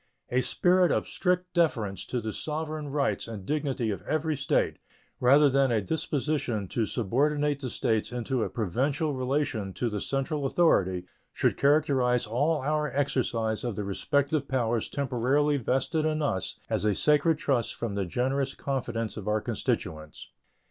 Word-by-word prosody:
A 125 +1 +3
spirit 180 +5 +3
of - - 0
strict 180 0 -1
deference 115 - +1
to 125 - -2
the 110 -2 -4
sovereign 155 -1 -3
rights 140 -3 0
and 105 -5 -7
dignity 135 -6 -1
of 100 - -4
every 155 0 -1
State, 140 0 0 0.4
rather 140 +4 +6
than 135 -1 +3
a 115 - +3
disposition 140 -4 -1
to 115 -3 0
subordinate 145 +6 +1
the 130 -3 -4
States 110 -1 0
into 125 +1 -2
a - - -1
provincial 135 - -1
relation 130 -6 -1
to 120 -2 -1
the 105 -1 -3
central 135 +1 -1
authority, 95 - +2 0.3
should - - +1
characterize 135 -4 +3
all 140 +7 0
our 150 0 0
exercise 120 -5 0
of 120 -4 -2
the 105 - -3
respective 140 - 0
powers 120 -4 0
temporarily 140 +2 +1
vested 135 +5 0
in 155 0 0
us 95 -10 -1
as - - -1
a 105 -2 +2
sacred 150 - +3
trust 130 -6 0
from 115 -3 -3
the 100 -1 -1
generous 135 +7 -1
confidence 115 -5 -3
of 105 - -6
our 105 0 +2
constituents. 75 -6 -3
135 Hz, 155 wpm, -28 LUFS, 115-150 Hz, 0.4 s, rather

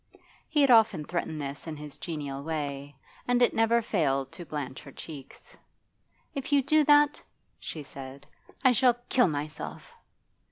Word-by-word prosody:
He 300 -2 +2
had 275 -2 +5
often 215 -9 +5
threatened 160 -2 -3
this 140 +2 -6
in 155 -2 -5
his 150 -1 -10
genial 145 -4 -5
way, 145 -2 -4 0.3
and 245 0 +3
it 245 - +4
never 225 +1 +3
failed 140 - 0
to 175 - -10
blanch 140 -3 -5
her 140 - -12
cheeks. 140 -2 -11 0.8
'If 275 +1 -5
you 280 -1 +4
do 305 +3 +4
that,' 295 0 +5 0.4
she 155 - -6
said, 135 0 -10 0.4
'I 255 - +7
shall 250 0 +4 0.2
kill 250 -4 +4
myself. 150 -1 -5
155 Hz, 155 wpm, -28 LUFS, -, 0.8 s, I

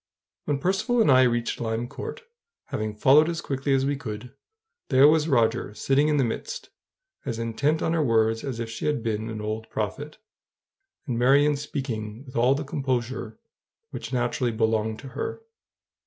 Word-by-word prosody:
When 145 -2 0
Percivale 195 - +1
and 150 - +5
I 130 0 +7
reached 120 -1 -1
Lime 115 +1 -2
Court, 140 - -7 0.5
having 110 0 -3
followed 145 +8 +5
as 170 -1 -2
quickly 140 0 -2
as 135 0 +1
we 140 +1 0
could, 120 -2 -7 0.6
there 135 +1 +7
was 155 0 +4
Roger 115 -5 +1
sitting 135 +6 +2
in 150 -1 +2
the 135 - +3
midst, 465 - -4 0.5
as 115 - -3
intent 115 +7 0
on 165 - +1
her 165 - +2
words 115 -2 +2
as 130 -5 -4
if 115 - -3
she 115 +4 -4
had 150 -6 0
been, 110 -1 -2
an 110 -1 -5
old 110 +1 -4
prophet, 140 +8 -4 0.9
and 120 -6 -2
Marion 140 +4 +4
speaking 125 -5 -5
with 130 0 -13
all 125 +3 +4
the 150 - -3
composure 130 -5 -3 0.5
which 115 - -6
naturally 120 -1 0
belonged 110 -1 0
to 135 - -9
her. 145 - -5
125 Hz, 170 wpm, -25 LUFS, 115-145 Hz, 0.9 s, I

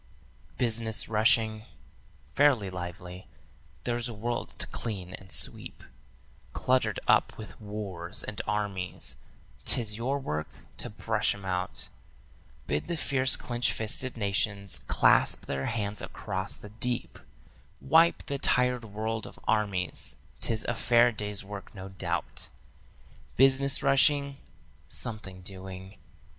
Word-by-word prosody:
"'Business 115 -2 +3
rushing?' 110 0 +3 0.7
Fairly 125 -10 +4
lively. 90 0 -7 0.6
There's 120 0 -1
a 115 - -6
world 120 +3 -3
to - - +1
clean 95 -6 -5
and 95 -1 -8
sweep, 75 - +1 0.7
Cluttered 125 -5 +1
up - - +4
with 110 +1 -10
wars 100 -4 -4
and 105 - -4
armies; 100 -3 -1 0.5
'tis 110 -3 +1
your 130 +4 0
work 75 - -3 0.3
to - - -4
brush - - 0
'em 100 -1 -11
out; 90 -1 -2 0.8
Bid 75 - -1
the 170 - -2
fierce 130 -3 +2
clinch 120 0 0
fisted 120 +3 0
nations 100 -1 +1
clasp - - +4
their 70 0 -2
hands 105 -3 -2
across 95 -1 -3
the 105 - -11
deep; 120 +3 -2 0.6
Wipe 165 +2 +4
the 140 -1 -3
tired 125 -2 +2
world 110 +1 -3
of - - -13
armies; 100 -5 +1 0.2
'tis 110 -1 0
a 120 - -1
fair 120 +1 +4
day's 105 -2 -4
work 100 +1 -9
no 95 0 -7
doubt. 95 - -3 0.9
'Business 135 +1 +4
rushing?' 140 0 +4 0.5
Something 95 -4 -2
doing. 95 +1 -8
110 Hz, 120 wpm, -29 LUFS, 95-120 Hz, 0.9 s, Fairly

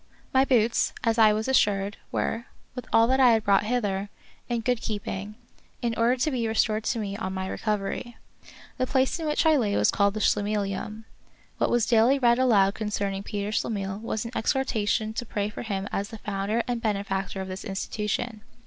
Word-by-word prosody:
My 265 +1 +5
boots, 235 -3 +2
as 230 -1 +1
I 215 -1 +7
was 215 +2 -1
assured, 205 -6 +2
were, 230 +2 -2 0.3
with 250 -2 -7
all 225 - +6
that 260 +3 +2
I 250 -3 +7
had 220 -1 +2
brought 200 0 +3
hither, 205 -4 -1 0.4
in 235 -1 0
good 245 0 0
keeping, 205 -1 -4 0.5
in 235 -1 +1
order 235 +2 +3
to 300 +5 0
be 240 -4 -1
restored 220 -1 +1
to 240 - 0
me 200 -3 -3
on 190 -3 -4
my 190 0 -3
recovery. 210 +3 -3 0.6
The 255 - +1
place 260 +5 +1
in 320 - -3
which 300 +2 +1
I 315 -1 +5
lay 210 -6 +1
was - - +3
called 200 0 +2
the - - -2
Schlemihlium. 210 +1 -1 0.5
What - - +2
was 240 -2 +2
daily 240 +3 +4
read 240 -2 +3
aloud 205 -6 +4
concerning 200 -2 -2
Peter 205 0 -4
Schlemihl 200 -2 -2
was 220 -1 -3
an 230 - -5
exhortation 220 -3 0
to 240 - -3
pray 205 -3 -2
for - - -7
him 200 -4 -3
as 200 +1 -2
the 225 - -8
founder 205 +2 -2
and 240 -2 -2
benefactor 200 -3 -2
of 190 - -4
this 185 0 -6
institution. 210 +2 -3
215 Hz, 195 wpm, -26 LUFS, 200-240 Hz, 0.6 s, I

